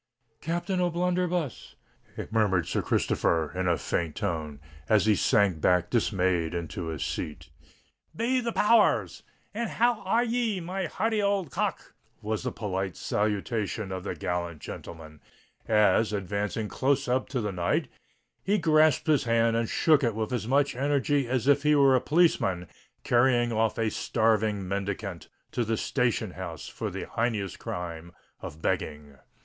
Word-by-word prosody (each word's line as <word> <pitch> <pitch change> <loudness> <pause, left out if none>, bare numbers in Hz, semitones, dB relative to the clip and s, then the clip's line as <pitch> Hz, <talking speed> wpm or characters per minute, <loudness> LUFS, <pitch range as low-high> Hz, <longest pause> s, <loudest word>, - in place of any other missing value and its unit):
"Captain 175 +3 -1
O'Blunderbuss!" 180 -3 -1 0.6
murmured 100 -6 +2
Sir - - 0
Christopher, 80 -2 +1
in 90 0 -1
a 85 -2 +2
faint 85 -3 -2
tone, 75 -4 -3 0.3
as 110 -1 +4
he 110 - +5
sank 100 -5 +2
back 90 0 +2
dismayed 90 -7 +1
into 85 0 -4
his 80 -4 -3
seat. 75 -1 -5 0.6
"Be 250 +3 +1
the 235 -1 -2
power 220 0 +4
rs! - - -13 0.3
and 230 +2 -2
how 240 -1 +1
are 225 +5 +2
ye, 230 -4 0
my 185 +2 -3
hearty 220 +5 0
old 200 -7 0
cock?" - - -3 0.3
was 110 0 -3
the 125 - -3
polite 95 -4 -3
salutation 105 0 -2
of 95 -1 -4
the 95 - -4
gallant 85 0 -3
gentleman, 80 -2 -9 0.5
as, 105 0 +3
advancing 105 +2 -2
close 135 +4 0
up 125 +1 0
to 130 - -2
the 105 -3 -2
knight, 95 - 0 0.6
he 205 +2 +2
grasped 155 -4 +3
his 150 -4 +2
hand 115 0 +2
and 115 -1 0
shook 155 -3 +3
it 115 -3 +1
with 110 +3 -2
as 110 -3 -2
much 140 +1 +2
energy 140 0 +1
as 130 0 -1
if 145 0 +5
he 150 +1 +3
were 135 -2 +5
a 125 - +2
policeman 130 - +2 0.4
carrying 120 -1 +3
off 110 -1 +1
a 115 -2 0
starving 110 -4 +1
mendicant 100 -1 -4 0.2
to 120 - 0
the 115 0 -1
station 120 -6 0
house 90 -3 -7
for - - -4
the - - -5
heinous 110 -5 -1
crime 85 -1 -6 0.3
of 80 +2 -9
begging. 75 -2 -3
110 Hz, 155 wpm, -27 LUFS, 95-150 Hz, 0.6 s, he